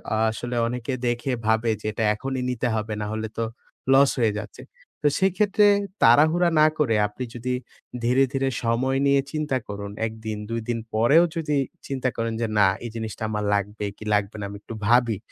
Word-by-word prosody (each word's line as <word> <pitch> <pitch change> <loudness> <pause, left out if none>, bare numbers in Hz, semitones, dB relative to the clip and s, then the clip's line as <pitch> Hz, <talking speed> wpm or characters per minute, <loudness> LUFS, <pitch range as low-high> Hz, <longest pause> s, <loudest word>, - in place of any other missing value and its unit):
আ - - 0
আসলে 120 +2 -5
অনেকে 125 +2 -3
দেখে 120 +2 -1 0.2
ভাবে 110 +1 +2
যে, 110 - -4
এটা 110 +2 -2
এখনই 130 +4 -3
নিতে 125 0 -1
হবে 110 0 -2
নাহলে 110 +1 -3
তো 115 - 0 0.5
লস 135 +1 +6
হয়ে 110 -3 +2
যাচ্ছে। 105 -1 -9 0.4
তো 150 - +5
সেক্ষেত্রে 200 +2 +3 0.4
তাড়াহুড়া 155 +9 +5
না 155 - +7
করে, 120 -7 +2
আপনি 115 +5 -7
যদি 125 +2 -2 0.5
ধীরে, 125 +3 +4
ধীরে 135 0 +1
সময় 125 +3 +1
নিয়ে 140 0 +4
চিন্তা 150 -4 -1
করুন 100 0 -6 0.2
১ 110 - -7
দিন, 110 -1 -3
২ 115 0 -2
দিন 115 - 0
পরেও 120 +10 +5
যদি 150 -3 0 0.3
চিন্তা 130 -2 -1
করেন 115 -1 -1
যে 115 - +1
না, 100 - +6 0.2
এই 115 - -5
জিনিসটা 110 -1 -5
আমার 105 -1 -2
লাগবে, 105 +1 -3
কি 110 - -10
লাগবে 105 0 0
না, 100 - -4
আমি 100 - -8
একটু 115 - -8
ভাবি। 120 -2 +4
120 Hz, 190 wpm, -24 LUFS, 110-135 Hz, 0.5 s, না